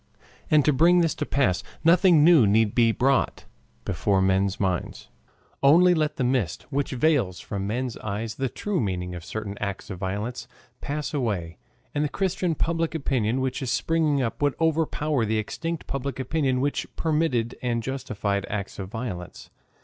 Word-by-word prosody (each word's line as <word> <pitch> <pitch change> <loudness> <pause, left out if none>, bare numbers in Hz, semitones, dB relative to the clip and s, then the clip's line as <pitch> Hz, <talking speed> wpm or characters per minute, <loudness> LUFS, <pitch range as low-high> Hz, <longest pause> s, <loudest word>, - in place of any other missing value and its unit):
And 150 -2 +4
to 150 - +4
bring 175 +6 +5
this 165 -2 +1
to 150 - -4
pass, 115 -11 +1 0.2
nothing 170 -1 +5
new 155 -9 +6
need 105 +1 +3
be 115 -2 +4
brought 130 +3 +1 0.4
before 95 +2 +1
men's 95 +1 +1
minds. 95 -3 -2 0.5
Only 175 +6 +6
let 155 -2 0
the 130 - -1
mist, 125 - 0
which 140 0 -1
veils 130 - +1
from 100 -2 -4
men's 125 +2 -2
eyes 110 +2 -4
the 135 -1 -2
true 205 +5 -2
meaning 90 -4 -2
of 85 -2 -7
certain 100 0 -6
acts 100 0 -4
of 90 - -6
violence, 105 +6 -4 0.3
pass 150 +2 -4
away, 100 - -2 0.3
and 145 - 0
the 150 - 0
Christian 185 -2 -1
public 165 +1 -1
opinion 130 -5 0
which 130 +1 -2
is 130 - -3
springing 155 -2 +1
up 115 - -4
would 145 -1 +2
overpower 155 -4 +1
the 110 0 0
extinct 165 +9 -4
public 135 -1 -4
opinion 130 -1 0
which 145 +1 -1
permitted 150 -8 0
and 120 -2 -1
justified 105 -6 -2
acts 100 -2 -4
of 95 -1 -5
violence. 105 -6 -6
130 Hz, 165 wpm, -25 LUFS, 105-150 Hz, 0.5 s, new